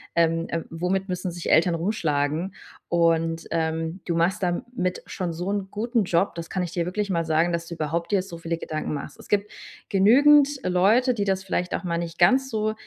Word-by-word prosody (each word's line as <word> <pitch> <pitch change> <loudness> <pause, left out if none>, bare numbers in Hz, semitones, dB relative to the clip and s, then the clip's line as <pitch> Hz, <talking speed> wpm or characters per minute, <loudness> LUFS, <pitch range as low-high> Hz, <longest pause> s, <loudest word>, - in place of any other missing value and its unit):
ähm, 165 0 +2
äh: 165 -1 -2
„Womit 180 +4 -1
müssen 180 0 -2
sich 175 0 -4
Eltern 170 +1 +4
rumschlagen?“ 165 -2 -1 0.4
Und, 165 -1 +1
ähm, 165 +2 -2
du 170 - -1
machst 180 +5 +1
damit 185 +1 -2
schon 180 -2 -4
so 175 +4 -4
'n 200 -2 -2
guten 230 +2 0
Job, 175 +2 +1
das 170 0 -6
kann 185 - -1
ich 175 - -5
dir 175 -1 -1
wirklich 200 +3 -2
mal 170 -1 +1
sagen, 165 +2 +1
dass 170 0 -2
du 170 - -6
überhaupt 165 +3 -2
dir 195 - +3
so 170 -3 -9
viele 165 0 -3
Gedanken 155 -2 -4
machst. 145 +1 -7
Es - - -13
gibt 205 0 +1 0.4
genügend 275 +9 +6 0.2
Leute, 210 +8 +3
die 205 -4 -1
das 190 -1 0
vielleicht 180 -1 -1
auch - - -4
mal 170 -1 -1
nicht 170 -1 -5
ganz 260 +10 +4
so 215 -1 -1
175 Hz, 205 wpm, -25 LUFS, 165-200 Hz, 0.4 s, genügend